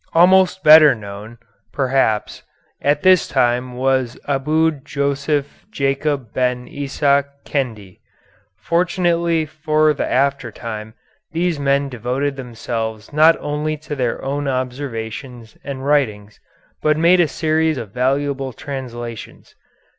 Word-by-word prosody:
Almost 185 +2 +5
better 155 -3 +8
known, 105 +2 -9 0.3
perhaps, 130 -5 0 0.4
at 145 +1 +1
this 185 -2 +5
time 125 +1 0
was 130 -1 0
Abu 155 +4 +2
Joseph 140 +1 -2
Jacob 135 -3 -1
Ben 125 -1 -1
Isaac 140 0 0 0.2
Kendi. 110 -9 -4 0.6
Fortunately 170 - +1
for 155 0 +1
the 145 - -3
after 140 +1 +1
time, 110 -1 -7 0.4
these 170 -2 0
men 140 0 +1
devoted 130 +3 -2
themselves 115 -3 -5
not 160 +2 +5
only 150 +1 -2
to 150 0 -7
their 125 -1 -2
own 140 +1 -2
observations 125 -2 -5
and 135 -1 -6
writings 110 -8 0 0.4
but 155 0 +2
made 170 +3 +4
a 175 - +4
series 155 0 0
of 110 -5 -6
valuable 135 +2 -1
translations. 120 -4 -8
140 Hz, 115 wpm, -19 LUFS, 125-155 Hz, 0.6 s, better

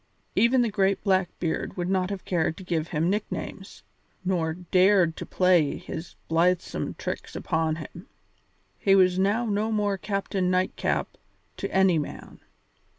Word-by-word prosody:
Even 245 +2 +4
the 230 - -1
great 195 -1 +1
Blackbeard 185 -4 -1
would 175 -1 -1
not 185 -1 +1
have 200 -2 -5
cared 165 -3 0
to 190 - -9
give 165 -3 -1
him 160 0 0
nicknames, 205 +3 -4 0.4
nor 170 -4 0
dared 180 -1 +3
to - - -7
play 180 -5 +3
his 165 +2 -8
blithesome 170 +2 0
tricks - - -5
upon 160 -1 0
him; 155 -3 -10 0.7
he 195 - +4
was 185 -1 +4
now 205 +5 +2
no 215 +1 0
more 205 -2 0
Captain 195 -2 -1
Nightcap 185 0 -1 0.4
to - - -4
any 190 -3 +4
man. 150 - -7
185 Hz, 145 wpm, -26 LUFS, 170-195 Hz, 0.7 s, Even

